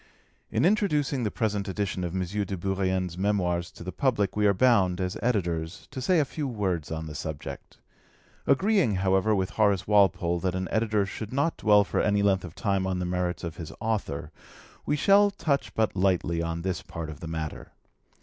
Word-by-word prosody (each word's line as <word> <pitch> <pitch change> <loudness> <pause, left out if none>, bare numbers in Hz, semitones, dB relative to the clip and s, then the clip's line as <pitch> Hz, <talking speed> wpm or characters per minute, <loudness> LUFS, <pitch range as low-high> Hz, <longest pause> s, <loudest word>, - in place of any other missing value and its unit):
In - - +1
introducing 150 -9 +2
the 110 - 0
present 105 -2 -1
edition 95 -1 -2
of 90 0 -3
M. 95 - 0
de 100 +1 -3
Bourrienne's 95 -1 -1
Memoirs 90 -4 0
to - - -10
the 90 - -5
public 115 -7 0
we 105 0 +3
are - - +5
bound, 95 -5 +3
as 90 0 -2
Editors, 85 -8 -1
to 130 - -5
say 175 +6 +3
a 150 - +3
few 145 +1 -4
Words 95 - -2
on 80 0 -3
the 75 - -7
subject. 75 -1 -7 0.7
Agreeing, 175 - +3
however, 95 +3 +2
with 95 -1 -1
Horace 100 -3 +2
Walpole 95 -4 +3
that 95 0 -1
an 95 0 -2
editor 110 -2 +1
should 105 +2 -6
not 140 +5 +1
dwell 105 -1 +5
for - - -1
any 105 -1 +2
length 95 -2 +2
of 85 -2 -9
time 100 -2 0
on 95 -1 -1
the 90 - -2
merits 90 0 -2
of 85 -2 -5
his 80 - -7
author, 105 -9 -2 0.6
we - - +2
shall 200 +7 +5
touch 145 -8 -1
but 110 -3 +1
lightly 90 -3 +1
on 85 0 -3
this 95 -1 -2
part 80 -1 -6
of 75 - -10
the 85 - -7
matter. 80 -6 -5
95 Hz, 195 wpm, -27 LUFS, 90-110 Hz, 0.7 s, are